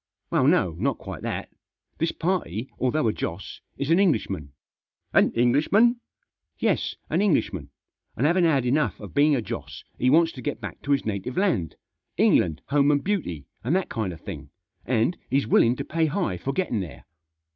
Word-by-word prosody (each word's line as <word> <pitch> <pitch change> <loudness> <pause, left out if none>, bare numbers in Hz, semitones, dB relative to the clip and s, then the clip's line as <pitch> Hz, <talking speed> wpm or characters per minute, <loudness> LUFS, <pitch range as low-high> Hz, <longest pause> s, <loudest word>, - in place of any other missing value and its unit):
Well, - - +3
no, - - +3
not - - 0
quite - - -8
that. - - -4 0.5
This 165 +1 +1
party, 140 - -2
although 130 +1 +1
a 110 - +1
Joss, 85 +4 -5 0.2
is 140 +3 -1
an 170 - +5
Englishman." 100 - 0 0.3
" - - -46
An - - +5
Englishman 140 - +3
1" 240 0 +1 0.3
" - - -58
Yes, - - 0 0.2
an - - +2
Englishman; 200 -7 0 0.5
and 130 - 0
having 175 +3 +4
had 140 -6 +2
enough 125 - +1
of 105 - -9
being 145 +1 +4
a 120 - -1
Joss - - -7 0.2
he 125 - +3
wants 165 +3 +5
to 130 - -9
get 145 - -3
back - - -8
to 145 - -3
his 140 - 0
native 105 +3 -3
land, 175 - +1 0.4
'England, 80 -1 +3
home 140 0 +3
and 145 -1 +2
beauty,' 140 - -2 0.2
and 135 +10 +1
that 190 - 0
kind 110 -6 -2
of 85 -1 -10
thing, 75 -7 -8 0.4
and 125 +7 +1
he's 135 0 +2
willing 115 +2 +4
to - - -5
pay 165 0 +1
high 150 - -1
for 135 - -2
getting 135 - -1
there." 70 -9 -7
135 Hz, 190 wpm, -25 LUFS, 105-165 Hz, 0.5 s, an